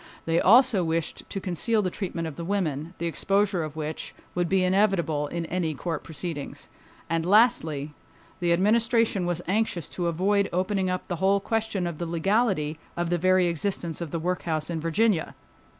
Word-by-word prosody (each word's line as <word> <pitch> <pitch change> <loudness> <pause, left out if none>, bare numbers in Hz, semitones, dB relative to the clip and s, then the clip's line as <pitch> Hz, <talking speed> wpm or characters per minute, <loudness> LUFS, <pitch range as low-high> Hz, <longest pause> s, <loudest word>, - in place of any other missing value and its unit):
They 165 +1 +2
also 230 -2 +6
wished 165 -1 -3
to 195 - -3
conceal 205 +4 0
the 185 - -1
treatment 170 -4 -4
of 155 - -7
the 170 - -6
women, 170 -4 -2
the 170 - -3
exposure 195 +2 +1
of 155 -1 -6
which 155 0 -5 0.2
would 175 -1 0
be 190 -1 +3
inevitable 180 -6 +2
in 170 +2 -4
any 165 -2 -2
court 165 +1 -4
proceedings. 160 -2 -6 0.4
And 165 0 0
lastly, 160 - +3 0.5
the 175 -1 +1
Administration 220 +1 +2
was 175 0 -2
anxious 195 -4 0
to 175 -2 -2
avoid 195 +4 +1
opening 185 +1 0
up 185 0 -3
the 175 - -3
whole 195 +2 +3
question 220 -3 -1
of 170 -3 -4
the 170 - -3
legality 170 -3 +1 0.2
of 175 0 -1
the 175 - +1
very 185 +1 +4
existence 170 0 -2
of 170 - -4
the 165 - -3
workhouse 165 -2 -2
in 165 - -2
Virginia. 170 +2 +1
175 Hz, 175 wpm, -26 LUFS, 165-195 Hz, 0.5 s, also